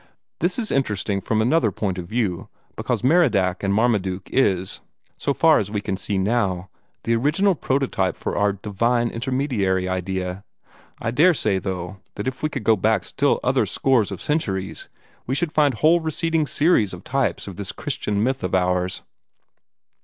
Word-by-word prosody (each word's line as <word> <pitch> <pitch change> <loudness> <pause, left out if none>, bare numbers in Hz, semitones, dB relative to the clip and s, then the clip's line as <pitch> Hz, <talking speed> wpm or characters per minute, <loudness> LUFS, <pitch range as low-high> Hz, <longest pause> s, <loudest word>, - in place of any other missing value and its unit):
This 175 +3 0
is 225 -3 -2
interesting 105 -6 0
from 110 +3 +1
another 125 -2 +2
point 95 -1 -2
of 85 - -6
view, 105 -5 -2 0.3
because - - -2
this - - +3
Merodach 110 - +3
or 100 - 0
Marmaduke 100 -4 0
is, 95 -8 +1 0.3
so - - -1
far 160 +2 +4
as 100 - -3
we 105 0 -2
can 100 -1 -3
see 100 +1 -3
now, 95 -3 0 0.3
the 115 - +1
original 150 - +2
prototype 130 - 0
of - - -3
our 100 -1 +2
'divine 115 +4 0
intermediary' 115 -7 0
idea. 95 +1 -3 0.6
I 115 - -2
daresay, 130 - +3
though, 95 -1 -5 0.2
that 105 - -4
if 130 0 -4
we 155 - 0
could 135 -6 -5
go 110 +1 +4
back 95 - +1
still - - +1
other - - +2
scores 130 -6 +2
of 95 - -6
centuries, 95 -12 -2 0.4
we 130 - 0
should 165 +1 0
find 145 -4 +3
whole 160 +8 +4
receding 160 -1 0
series 140 - +2
of 90 - -13
types 135 -4 -1
of 95 -3 -8
this 100 -2 -5
Christ 135 -3 -5
myth 110 +5 0
of 90 0 0
ours." 90 0 0
110 Hz, 170 wpm, -22 LUFS, 95-135 Hz, 0.6 s, far